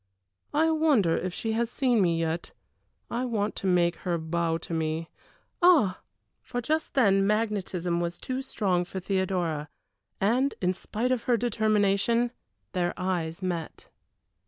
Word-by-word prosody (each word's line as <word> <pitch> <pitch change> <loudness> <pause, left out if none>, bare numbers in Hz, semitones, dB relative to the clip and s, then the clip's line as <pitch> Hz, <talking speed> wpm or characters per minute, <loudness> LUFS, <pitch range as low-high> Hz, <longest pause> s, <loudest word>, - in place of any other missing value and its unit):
I 320 +2 +4
wonder 290 - +3
if 185 - -2
she 220 +5 -3
has 230 +1 0
seen 245 -3 +2
me 170 -3 +2
yet. 165 0 -2 0.6
I 240 +2 -1
want 215 -4 -1
to 195 - -2
make 175 -1 +3
her 175 -2 -1
bow 165 0 -1
to 165 - -7
me. 160 0 -2 0.5
Ah!" 315 - +5 0.4
For 245 - -4
just 315 +6 -1
then 195 -6 +4
magnetism 195 -5 0
was 170 0 -2
too 260 +1 -3
strong 195 -9 0
for 190 +1 -6
Theodora, 180 -5 -1 0.5
and, 245 +8 +2
in 180 0 +1
spite 230 +6 -2
of 255 -3 0
her 245 -2 +3
determination, 220 +1 +2 0.4
their 175 -1 -1
eyes 180 -2 -2
met. 170 -3 -4
195 Hz, 145 wpm, -27 LUFS, 175-235 Hz, 0.6 s, Ah